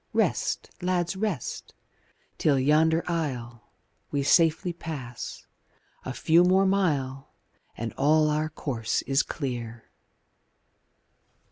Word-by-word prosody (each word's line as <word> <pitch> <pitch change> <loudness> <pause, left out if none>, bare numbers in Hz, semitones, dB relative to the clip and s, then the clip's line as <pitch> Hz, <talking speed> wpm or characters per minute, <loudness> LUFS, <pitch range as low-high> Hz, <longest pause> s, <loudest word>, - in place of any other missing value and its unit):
Rest, - - 0
lads, 180 0 0
rest! 190 - -4 0.6
till 145 -3 +3
yonder 160 +4 +3
isle 120 -8 -4 0.4
We 140 -1 -1
safely 165 +4 +3
pass 135 -8 -7 0.6
a - - -4
few 165 +2 +4
more 190 +2 +4
mile 145 -9 0 0.4
And 115 0 -4
all 155 +2 +4
our 155 +1 0
course 125 -7 -2
is 135 +1 +2
clear. 120 -5 -5
150 Hz, 100 wpm, -27 LUFS, 130-170 Hz, 0.6 s, few